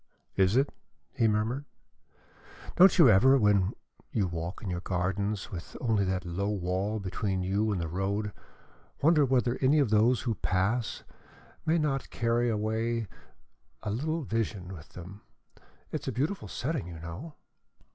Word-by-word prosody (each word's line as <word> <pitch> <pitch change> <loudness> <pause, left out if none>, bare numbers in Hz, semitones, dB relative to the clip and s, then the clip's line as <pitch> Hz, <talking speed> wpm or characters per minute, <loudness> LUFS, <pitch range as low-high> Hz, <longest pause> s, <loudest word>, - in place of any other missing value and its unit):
"Is 95 +2 +3
it?" 140 +2 +2 0.4
he 115 - +2
murmured. 110 +6 0 1.1
"Don't 185 +1 +7
you 165 -6 +8
ever, 130 +8 +6
when 105 -5 +3 0.4
you 105 - +1
walk 85 +3 -5
in 100 - -4
your 90 - -2
gardens, 95 +3 -2
with 85 -3 -7
only 110 -5 +1
that 95 -1 -1
low 95 +4 -2
wall 100 +2 -1
between 95 -1 -2
you 100 +4 +1
and 100 - -1
the 85 - -2
road, 100 +4 -2 0.7
wonder 155 -1 +5
whether 125 -1 +1
any 135 +3 +4
of 140 -7 +2
those 110 +3 +4
who 115 - -1
pass 100 +4 -1
by 160 - -7
may - - +4
not 140 -4 -1
carry 120 0 +1
away 110 +1 -1 0.8
a 105 - -2
little 155 +8 -1
vision 105 -6 -3
with 80 -3 -11
them? 90 +4 -10 0.7
It - - -3
is - - -11
a - - 0
beautiful 155 +10 -2
setting, 135 - -3
you 85 -2 -8
know." 90 - -8
105 Hz, 155 wpm, -29 LUFS, 95-125 Hz, 1.1 s, you